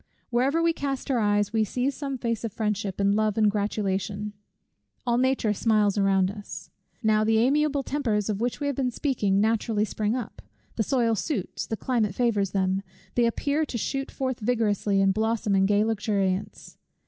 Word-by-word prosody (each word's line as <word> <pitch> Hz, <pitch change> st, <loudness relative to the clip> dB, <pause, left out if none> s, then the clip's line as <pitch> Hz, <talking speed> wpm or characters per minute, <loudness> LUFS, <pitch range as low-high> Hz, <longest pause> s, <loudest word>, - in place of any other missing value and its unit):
Wherever 270 Hz, +7 st, +2 dB
we 335 Hz, 0 st, +3 dB
cast 275 Hz, -2 st, -3 dB
our 250 Hz, -, +2 dB
eyes, 205 Hz, 0 st, +1 dB
we 220 Hz, -1 st, +3 dB
see 250 Hz, +6 st, -1 dB
some 275 Hz, -1 st, -4 dB
face 230 Hz, -2 st, -2 dB
of 230 Hz, -, -3 dB
friendship, 205 Hz, -2 st, -2 dB
and 200 Hz, 0 st, +3 dB
love, 215 Hz, 0 st, +1 dB
and 215 Hz, -2 st, +4 dB
gratulation: 205 Hz, 0 st, -2 dB, 0.7 s
All 240 Hz, 0 st, +2 dB
nature 260 Hz, -4 st, +2 dB
smiles 210 Hz, -1 st, +2 dB
around 195 Hz, -2 st, +2 dB
us. 205 Hz, 0 st, -9 dB, 0.3 s
Now 215 Hz, -1 st, +3 dB
the 220 Hz, +1 st, +3 dB
amiable 285 Hz, +4 st, +2 dB
tempers 230 Hz, -8 st, -1 dB
of 210 Hz, -1 st, -2 dB
which 245 Hz, 0 st, -1 dB
we 290 Hz, -, -2 dB
have 285 Hz, -2 st, -1 dB
been 260 Hz, -1 st, 0 dB
speaking 225 Hz, -7 st, 0 dB
naturally 220 Hz, 0 st, +1 dB
spring 215 Hz, +2 st, -1 dB
up. 245 Hz, -5 st, -6 dB, 0.3 s
The -, -, 0 dB
soil 235 Hz, -1 st, +2 dB
suits, 220 Hz, -, -3 dB
the 220 Hz, -, -3 dB
climate 220 Hz, -6 st, 0 dB
favours 210 Hz, -6 st, +1 dB
them. 190 Hz, 0 st, 0 dB, 0.3 s
They 240 Hz, -1 st, +3 dB
appear 285 Hz, +6 st, 0 dB
to 240 Hz, -, -4 dB
shoot 270 Hz, +4 st, -2 dB
forth 260 Hz, -2 st, -3 dB
vigorously 210 Hz, -3 st, +1 dB
and 195 Hz, 0 st, +3 dB
blossom 220 Hz, -1 st, 0 dB
in 195 Hz, 0 st, +4 dB
gay 205 Hz, +1 st, +3 dB
luxuriance. 205 Hz, -3 st, -2 dB
220 Hz, 180 wpm, -26 LUFS, 205-250 Hz, 0.7 s, and